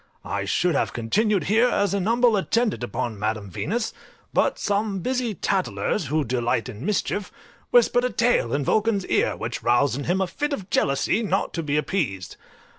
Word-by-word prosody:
I 100 0 -2
should 175 - +1
have - - 0
continued 195 - +1
here 225 +8 +3
as 205 -5 +1
an 200 -1 0
humble 235 0 +4
attendant 210 - 0
upon 120 -3 -3
Madam 105 -2 -2
Venus, 225 - -2 0.4
but - - +2
some 205 -1 -1
busy 250 -1 -1
tattlers, 190 -3 -1
who 155 +3 +1
delight 120 -1 -1
in 115 -2 -8
mischief, 205 0 -1 0.4
whispered 245 +1 +4
a - - +1
tale 235 - +1
in 140 +1 0
Vulcan's 215 -1 +1
ear, - - +1
which - - -4
roused 120 +2 +2
in 145 - -5
him 180 +3 +1
a 190 - +2
fit 295 +11 -3
of 195 -8 -6
jealousy 140 +10 +1
not 195 -3 -1
to 170 - -2
be 150 -2 -1
appeased. 135 - -2
185 Hz, 180 wpm, -24 LUFS, -, 0.4 s, humble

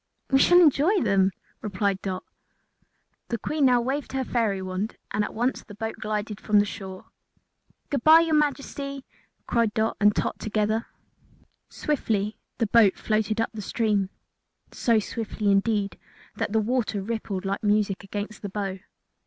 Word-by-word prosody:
"We 270 - +5
shall 350 +5 +7
enjoy 340 +4 +4
them," 195 -3 +3 0.3
replied 200 -2 -1
Dot. 185 -2 -4 1.0
The 235 - -2
Queen 300 +4 0
now 250 -2 +5
waved 270 +3 -3
her 265 0 0
fairy 225 -6 0
wand 185 +3 -4
and 210 +1 +1
at - - -5
once 245 +4 0
the 205 - -12
boat 220 +1 -4
glided 210 0 -3
from 210 -1 +2
the 205 - +5
shore. 190 -2 -8 0.9
"Good 280 -4 -1
bye, 320 +1 +8
your 330 -1 0
Majesty!" 280 -2 -1 0.4
cried 230 -3 +1
Dot 220 0 0
and 210 0 +5
Tot - - -1
together. 215 +1 -1 0.8
Swiftly 215 -8 -1 0.2
the 230 - +1
boat 215 -2 +5
floated 215 0 0
up 225 - 0
the 215 - -6
stream 205 -2 0 0.6
so 230 -2 +2
swiftly, 215 -1 -1
indeed, 200 0 +1 0.4
that - - -2
the 220 - +3
water 220 -1 0
rippled 205 -3 -4
like 195 +1 -2
music 205 -2 +1
against 205 +1 -6
the 205 - -5
bow. 195 -1 -3
215 Hz, 155 wpm, -26 LUFS, 200-240 Hz, 1.0 s, bye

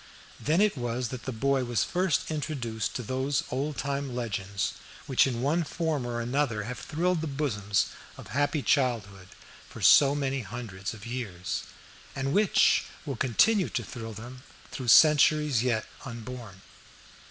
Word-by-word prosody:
Then 160 +6 +2
it 210 -4 +3
was 120 -1 -2
that 130 -1 -7
the 130 - -2
boy 135 +3 +1
was 120 -2 0
first 180 -5 0
introduced 130 -8 -3
to 125 - -3
those 130 +4 -1
old 140 +3 -2
time 140 -2 -3
legends 100 -5 -2 0.3
which 135 0 +3
in 120 -2 -2
one 160 +5 +2
form 155 -5 -2
or 120 -1 -3
another 120 -2 0
have 125 +4 -6
thrilled 175 +2 0
the 160 - -2
bosoms 105 -9 0 0.3
of - - -11
happy 145 +1 0
childhood 105 -9 0 0.4
for - - -10
so 140 0 +6
many 135 -1 -1
hundreds 105 -2 -6
of 105 +1 -11
years, 115 -7 -4 0.5
and 135 +1 -1
which 205 -1 +4 0.2
will 140 -3 -3
continue 180 - +3
to - - -2
thrill 115 -2 -7
them 120 +4 -9 0.3
through 130 - -6
centuries 150 -1 +6
yet 120 -3 0 0.2
unborn. 115 -5 -8
130 Hz, 155 wpm, -28 LUFS, 115-145 Hz, 0.5 s, so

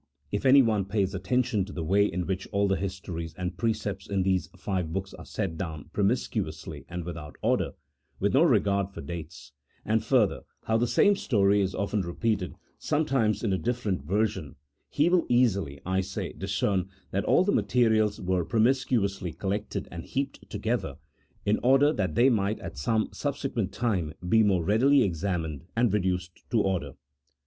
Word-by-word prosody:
If 105 +6 0
anyone 115 -7 +5
pays 100 -1 0
attention 105 +2 0
to 100 - -10
the 85 - -4
way 100 +5 +3
in 90 -1 -3
which 95 0 -3
all 100 -1 +2
the 95 - +2
histories 90 -4 -5
and 90 0 -4
precepts 105 -3 -2
in 100 -2 +1
these 95 -1 0
five 90 -5 -2
books 95 +3 -4
are - - -11
set 95 -6 -3
down 80 -4 -5
promiscuously 85 - -2
and 90 0 -4
without 85 -4 -7
order, - - +1 0.5
with - - +1
no - - +5
regard 100 -1 +3
for 100 - -9
dates; 80 0 -8 0.3
and 110 +1 +1
further, 120 -7 +2 0.2
how 110 - +1
the 120 +2 +1
same 205 - +4
story 100 - +2
is 95 -1 -1
often 100 +1 -1
re 85 -1 -5
peated, 110 -6 -1 0.2
sometimes 135 -9 +1
in 105 -4 +1
a 95 - 0
different 115 - -1
version, 95 - -1 0.3
he 150 +3 +2
will 175 -1 +3
easily, 100 - +2
I 95 +1 +1
say, 95 - -5
discern 95 -3 -1 0.2
that 100 +2 -1
all - - +4
the 200 - +1
materials 110 - +2
were 90 -1 0
promiscuously 110 - +1
col 95 +3 -3
lected 100 -1 -3
and 85 -1 -6
heaped 135 +1 -4
together, - - -2 0.5
in 105 +1 +2
order 135 +4 +5
that 90 -6 -1
they 130 +3 +5
might 105 -1 +1
at - - -7
some 110 +9 +1
subsequent 130 -8 -2
time 95 -10 -1
be 110 +4 +5
more 95 -5 +3
readily 125 - +4
examined 80 -4 -2
and 115 -3 +2
reduced 90 -3 -2
to 115 - +2
order. 90 -9 -1
100 Hz, 175 wpm, -27 LUFS, 90-115 Hz, 0.5 s, anyone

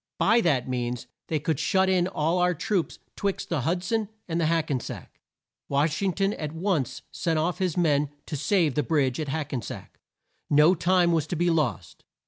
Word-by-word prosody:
By 230 +1 +4
that 140 - +1
means 125 -1 -3 0.2
they 155 - 0
could 150 0 -1
shut 190 0 +2
in 180 -1 +2
all 165 0 0
our 180 0 +2
troops 185 +2 -1 0.2
'twixt 200 -2 -2
the 160 -5 0
Hud 175 +7 -1
son 220 +1 -1 0.2
and 170 -1 -1
the 160 - +2
Hack 165 -1 +1
en 130 - +1
sack. - - -9 0.5
Wash 150 +4 +1
ing 195 -1 +2
ton 195 +2 +1
at 150 -1 -5
once 165 - -1
sent 165 -2 -1
off 165 +3 0
his 185 -3 -1
men 150 -4 +2 0.2
to 155 - -5
save 160 0 +2
the 150 - +1
bridge 140 -5 +1
at 155 - -2
Hack 150 0 -3
en 125 - -1
sack. - - -9 0.5
No 150 +4 +6
time 175 0 +3
was 160 -2 +1
to 175 - -3
be 175 +1 +2
lost. 145 - -2
165 Hz, 205 wpm, -26 LUFS, 145-180 Hz, 0.5 s, No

